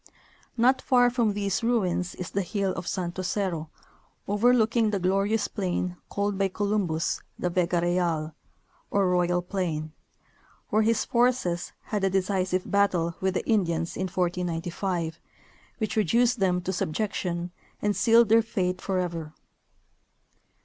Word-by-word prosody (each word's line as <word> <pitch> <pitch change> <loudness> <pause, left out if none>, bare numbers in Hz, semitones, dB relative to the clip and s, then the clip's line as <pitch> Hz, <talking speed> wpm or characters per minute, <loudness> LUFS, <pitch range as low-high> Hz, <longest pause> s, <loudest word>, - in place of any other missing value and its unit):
Not 255 +3 +4
far 245 -2 +4
from 235 -4 +1
these 200 +2 -1
ruins 185 -7 0
is 180 - -6
the 200 - 0
hill 195 +1 -1
of - - -6
Santo 180 -1 -3
Cerro, 180 -4 -2 0.6
overlooking 225 +1 +3
the 205 - 0
glorious 195 +4 +1
plain 180 -3 -2
called 200 -1 -1
by 195 - +3
Columbus 190 -5 -1 0.2
the 180 - -1
Vega 175 -1 +1
Real, 170 -3 0 0.6
or 200 -2 +2
Royal 175 0 +2
Plaiii, 170 -5 -3 0.8
where 215 - +4
his 225 0 +2
forces 240 -8 +1
had 210 -2 -3
a 195 - +3
decisive 185 -1 0
battle 180 -4 +1
with 190 0 0
the - - -1
Indians 170 -7 +1
in 190 - -2
1495, 175 -1 -2 0.6
Avhich 215 -2 -2
reduced 235 +4 +2
them 180 -2 +2
to 190 +2 -3
subjection 175 -1 -2 0.3
and 205 -1 0
sealed 230 -1 +5
their 225 +1 +6
fate 185 -5 -2
forever. 170 -5 -3
190 Hz, 135 wpm, -27 LUFS, 175-210 Hz, 0.8 s, their